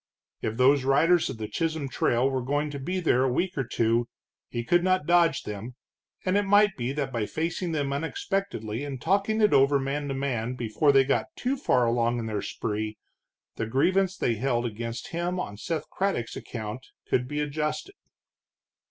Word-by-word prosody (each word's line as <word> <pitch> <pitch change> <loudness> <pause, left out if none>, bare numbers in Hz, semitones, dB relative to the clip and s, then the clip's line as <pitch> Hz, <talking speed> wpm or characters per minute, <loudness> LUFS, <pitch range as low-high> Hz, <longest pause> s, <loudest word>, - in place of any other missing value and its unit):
If 110 +1 -3
those 135 +2 +5
riders 160 +6 +4
of - - -5
the 110 -1 -4
Chisholm 160 -1 -2
Trail 125 0 +1
were 135 -1 -1
going 145 +4 -1
to 140 - -5
be 180 +8 -2
there 130 -7 +3
a 130 - +2
week 180 +8 0
or 135 - 0
two, 115 0 +1 0.4
he 120 - -3
could 175 +8 +3
not 185 -4 +2
dodge 170 -3 +3
them, 105 +4 -6 0.5
and 185 +1 +2
it 205 - +4
might 205 0 +4
be 120 +1 -2
that 140 -2 -2
by 110 -3 -1
facing 165 +2 -2
them 145 -3 -1
unexpectedly 160 - -2
and 140 -3 -5
talking 200 - +1
it 210 - +4
over 140 +1 +5
man 140 +2 -2
to 135 - -2
man 130 -3 -2
before 125 +5 +2
they 135 -1 +6
got 135 - 0
too 265 -7 -1
far 125 - +2
along 120 0 +1
in 115 - -3
their 105 -2 -2
spree, 105 0 -3 0.6
the 115 - -2
grievance 185 +10 +2
they 120 - +1
held 120 0 0
against 115 +1 -5
him 175 +2 -2
on 100 - -4
Seth 155 - -3
Craddock's 190 -12 -1
account 110 +2 -6 0.2
could 125 0 +1
be 150 +2 -3
adjusted. 150 - -2
140 Hz, 185 wpm, -27 LUFS, 120-170 Hz, 0.6 s, they